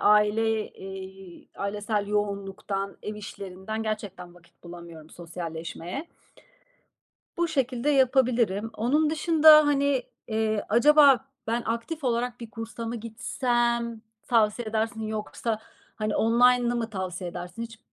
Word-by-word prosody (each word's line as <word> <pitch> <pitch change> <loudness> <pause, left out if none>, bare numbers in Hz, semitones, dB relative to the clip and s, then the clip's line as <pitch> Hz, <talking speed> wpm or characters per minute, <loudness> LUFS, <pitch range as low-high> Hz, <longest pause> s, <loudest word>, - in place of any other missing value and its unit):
aile, 215 +1 +3
eee, 190 -1 -10
ailesel 205 +1 -2
yoğunluktan, 200 -1 -2
ev 210 - -5
işlerinden 200 +1 -6
gerçekten 205 -5 -5
vakit 175 0 -23
bulamıyorum 170 -2 -11
sosyalleşmeye. 170 - -6 1.3
Bu 340 0 +1
şekilde 260 -2 -1
yapabilirim. 240 -6 +2
Onun 295 +7 +2
dışında, 315 -2 +7
hani, 280 -2 +2 0.3
eee, 220 -1 0
acaba 275 +2 +6 0.2
ben 230 +1 0
aktif 235 +7 -3
olarak 245 0 -1
bir 230 - -8
kursa 225 +1 -6
mı 235 +1 -3
gitsem 235 0 -1 0.2
tavsiye 225 0 +2
edersin 220 +1 -1
yoksa, 215 +1 -3 0.4
hani, 215 -1 -1
online'ı 240 +1 +4
mı 230 -1 -2
tavsiye 185 -2 -4
edersin 180 +7 -7
hiç 225 -1 -8
220 Hz, 115 wpm, -26 LUFS, 200-245 Hz, 1.3 s, dışında